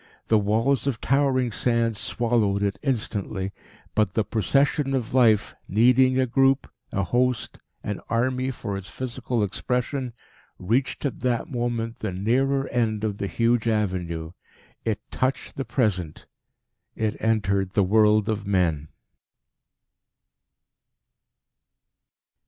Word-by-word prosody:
The 110 - +5
walls 115 +6 +1
of 130 -5 -1
towering 130 -2 +2
sand 115 0 +1
swallowed 105 -2 0
it 100 -1 -1
instantly. 105 -7 -2 0.4
But 105 -4 +1
the 110 - +1
Procession 135 +6 +1
of 125 -3 -3
life, 115 -5 +4
needing 125 +5 +4
a 130 - +3
group, 135 +2 +2 0.2
a 100 - 0
host, 120 +4 0 0.2
an 105 -2 -4
army 130 +2 0
for 100 -6 -4
its 95 -1 -6
physical 125 -2 -2
expression, 125 +5 -2 0.4
reached 120 +10 -1
at 135 - -2
that 125 0 -1
moment 120 -2 -2
the 105 - -3
nearer 135 +8 +1
end 110 -3 0
of 105 -2 -2
the 100 - -1
huge 115 +2 +1
avenue. 90 -7 -1 0.5
It 110 -2 -1
touched 130 +1 -2
the 135 - -3
Present; 105 - -1 0.7
it 110 -1 -1
entered 100 -4 +1
the 100 - +3
world 105 +1 +4
of 110 -2 -1
men. 85 -6 +1
115 Hz, 120 wpm, -25 LUFS, 100-130 Hz, 0.7 s, The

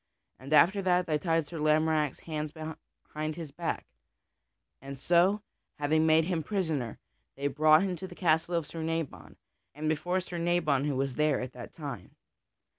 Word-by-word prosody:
After 155 - +4
that 180 -1 +2
they 155 -2 0
tied 165 -2 +1
Sir 165 +1 -7
Lamorack's 155 -1 +2
hands 155 -2 -4
behind 155 -1 -7
his 160 -4 -7
back, 165 +3 -3 1.0
and 135 +1 -8
so, 180 +8 +3 0.3
having 155 +2 +2
made 160 +1 +5
him 170 -2 -1
prisoner, 155 - -2 0.4
they 140 - -5
brought 155 +4 +5
him 190 -2 -1
to 190 - -6
the 180 - -11
castle 165 0 +1
of 165 -2 0
Sir 165 +2 -7
Nabon, 160 - -4 0.4
and 155 +1 -3
before 175 +4 0
Sir 175 -1 -6
Nabon 165 -5 +1
who 145 -2 0
was 135 0 -1
there 150 0 +2
at 125 0 -5
that 120 -1 -9
time. 135 - -8
155 Hz, 165 wpm, -30 LUFS, 145-170 Hz, 1.0 s, made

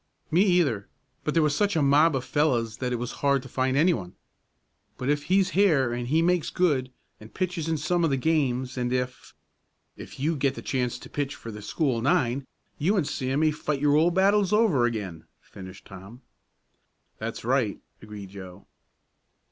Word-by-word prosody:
"Me, 170 +4 +4
either. 175 - +2 0.4
But 150 - -2
there 165 - +4
was 150 -1 +1
such 205 +3 +1
a 160 - +2
mob 145 +3 +4
of 130 -1 -2
fellows 120 -5 0
that 125 0 -3
it - - 0
was 120 0 -4
hard 140 -2 +2
to - - -10
find 130 +1 0
anyone. 140 - +1 0.8
But 130 - -3
if 145 0 0
he's 185 +1 +2
here 155 -11 +3
and 120 0 -3
he 160 +5 +2
makes 175 -1 +1
good, 140 -8 +1 0.3
and 110 +1 -13
pitches 180 -3 -3
in 160 - 0
some 170 +4 0
of 165 - +3
the 135 - +1
games, 130 -4 0
and 120 0 -1
if 125 0 -3 0.3
" - - -47
"If - - -13
you 155 +4 0
get 135 -1 0
the - - -8
chance 125 -2 -1
to - - -12
pitch 145 -1 -3
for 115 - -9
the 105 -1 -9
school 120 +2 -1
nine, 130 +1 +1 0.3
you 195 +8 +2
and 160 -6 +1
Sam 135 +2 -1
may 155 -1 +3
fight 150 -1 -3
your 145 0 +3
old 170 +3 +3
battles 200 0 +3
over 210 - +3
again," 100 -9 -4
finished 95 0 -12
Tom. 95 +7 -12 1.0
"That's - - -5
right," - - +1 0.2
agreed 105 -2 -9
Joe. 95 -1 -11
140 Hz, 190 wpm, -26 LUFS, 120-160 Hz, 1.0 s, Me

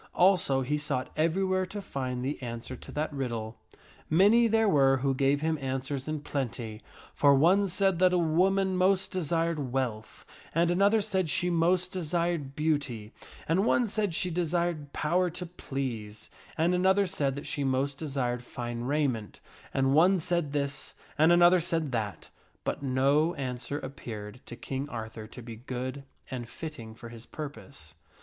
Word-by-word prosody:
Also 175 -8 +4
he 145 +4 -1
sought 140 -3 -2
everywhere 185 +4 +1
to 200 +3 -5
find 130 -8 -4
the 140 +2 -3
answer 120 +1 -5
to - - -11
that 150 0 -2
riddle. 120 -5 -4 0.5
Many 205 +8 +5
there 225 0 +3
were 135 -6 +4
who 135 +1 +1
gave 140 +2 +2
him 160 -1 0
answers 135 +1 -3
in 155 -1 -2
plenty, 120 -6 -4 0.3
for 140 -1 +5
one 185 +8 +4
said 190 -1 +1
that 185 0 +5
a 180 - +3
woman 185 +3 +2
most 185 +1 +2
desired 165 -5 -1
wealth, 120 -5 -3 0.3
and 170 +1 +3
another 200 +4 +4
said 190 -5 -1
she 180 +2 +1
most 175 +2 +2
desired 170 -5 -1
beauty, 145 -8 -1 0.3
and 170 +5 +2
one 240 +1 +3
said 210 -4 -1
she 180 +1 +1
desired 170 -3 -1
power 175 +5 +1
to 180 +2 -5
please, 130 -10 -5 0.3
and 165 +3 +2
another 190 +2 +3
said 145 -8 -1
that 145 - -6
she 145 - -2
most 135 +1 0
desired 125 -5 -2
fine 120 -1 -5
raiment; 130 -7 -1 0.3
and 135 0 +2
one 180 +6 +5
said 170 -3 -1
this, 140 0 -3 0.2
and 160 +2 +5
another 175 +1 +6
said 165 -4 -1
that; 110 -4 -3 0.3
but - - -2
no 140 +5 +2
answer 130 +1 -3
appeared 120 -5 -7
to 120 - -7
King 135 +3 -5
Arthur 110 -2 -6
to 120 +2 -11
be 115 -1 -8
good 130 +3 -5 0.3
and 120 -3 -5
fitting 115 -9 -8
for 115 0 -10
his 115 0 -11
purpose. 140 - -8
145 Hz, 160 wpm, -29 LUFS, 130-175 Hz, 0.5 s, another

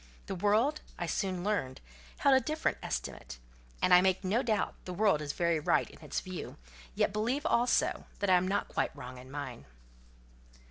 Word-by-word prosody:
The - - -4
world, 215 - +2 0.2
I 175 - -2
soon 185 0 -2
learned, 190 -11 -1 0.4
held 275 -1 +5
a - - +6
different 310 +1 -1
estimate: - - -5 0.5
and - - +5
I 180 - +9
make 190 +1 +2
no 205 +6 +2
doubt, 220 -5 0
the 180 - -5
world 200 -6 +3
is 145 -1 -3
very 170 -2 +1
right 150 - +2
in - - -15
its 150 - -3
view, 185 -2 -7 0.4
yet - - +1
believe 240 +8 -1
also 245 -5 +2
that 200 - -1
I - - +8
am 180 +1 +2
not 200 +2 0
quite - - -1
wrong 125 +1 -8
in 130 +1 -12
mine. 135 -4 -6
190 Hz, 185 wpm, -31 LUFS, 165-220 Hz, 0.5 s, I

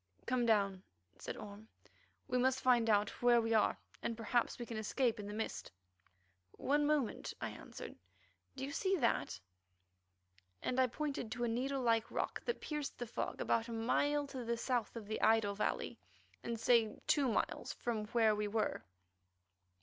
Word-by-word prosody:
"Come 245 -1 +1
down," 200 -4 +3 0.4
said - - -5
Orme. 210 0 -9 0.6
"We 250 - +1
must 260 +1 +2
find 240 -3 +4
out 205 -1 +2
where 240 -1 +6
we 225 0 +1
are; 220 - +3 0.4
perhaps 230 +2 0
we 240 - -5
can 230 -1 -5
escape 230 +2 0
in 205 - -5
the - - -5
mist." 220 - -4 0.8
"One 290 +2 +1
moment," 295 -6 0
I - - -3
answered. - - -9 0.6
"Do 265 0 -3
you 280 - -5
see 380 +5 +1
that?" 240 - +1 1.2
and 255 - 0
I 260 - +5
pointed 275 -3 -3
to 240 0 -3
a - - +2
needle 260 +3 -1
like 230 -2 +2
rock - - -2
that 475 - -2
pierced 300 -2 -4
the 240 - -3
fog 235 - -3
about 230 +1 +1
a - - -6
mile 290 +6 +1
to 265 -3 -6
the 235 0 -1
south 240 -2 -1
of 225 -2 -6
the 215 +1 -3
idol 220 -2 +4
valley, 205 - -2 0.4
and 230 -1 -3
say 230 -2 +3
two 285 -3 +3
miles 225 - -1
from 225 -3 -2
where 220 -1 +3
we 210 0 -1
were. 215 0 -1
235 Hz, 170 wpm, -36 LUFS, 220-260 Hz, 1.2 s, where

